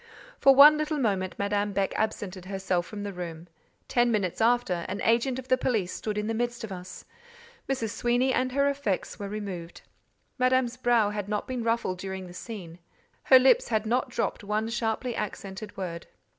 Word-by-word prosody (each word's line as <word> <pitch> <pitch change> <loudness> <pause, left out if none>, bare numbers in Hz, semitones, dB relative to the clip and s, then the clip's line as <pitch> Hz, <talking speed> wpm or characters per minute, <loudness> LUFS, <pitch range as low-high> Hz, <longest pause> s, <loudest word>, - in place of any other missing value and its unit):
For 275 -1 +6
one 300 +2 +9
little 305 0 -1
moment 195 -8 0
Madame 205 0 0
Beck 195 -1 0
absented 200 -4 -3
herself 190 -2 -1
from 205 -1 -6
the 200 -1 -5
room; 170 -2 -7 0.4
ten 240 -1 +2
minutes 200 -3 -1
after, 225 -7 +2
an 200 - -3
agent 240 +3 +2
of 260 -1 -7
the 255 -1 +3
police 210 -9 0
stood 210 -1 -4
in 210 - -1
the 225 - -1
midst 240 +1 -2
of 220 - -6
us. 180 -1 -8 0.6
Mrs. 230 -5 -1
Sweeny 245 +3 +1
and 255 0 0
her 280 +1 +3
effects 275 -10 -2
were 200 -1 -5
removed. 195 -5 -6 0.6
Madame's 255 -1 +2
brow 240 -4 +2
had 205 -1 -4
not 210 -1 -2
been 255 -2 -3
ruffled 230 -5 0
during 190 0 -5
the 175 - -11
scene—her 210 - 0
lips 255 -1 +4
had 220 -2 0
not 245 +3 0
dropped - - -2
one 210 +2 -1
sharply 230 +1 -2
accented 205 0 -6
word. 170 -3 -5
215 Hz, 180 wpm, -27 LUFS, 190-245 Hz, 0.6 s, one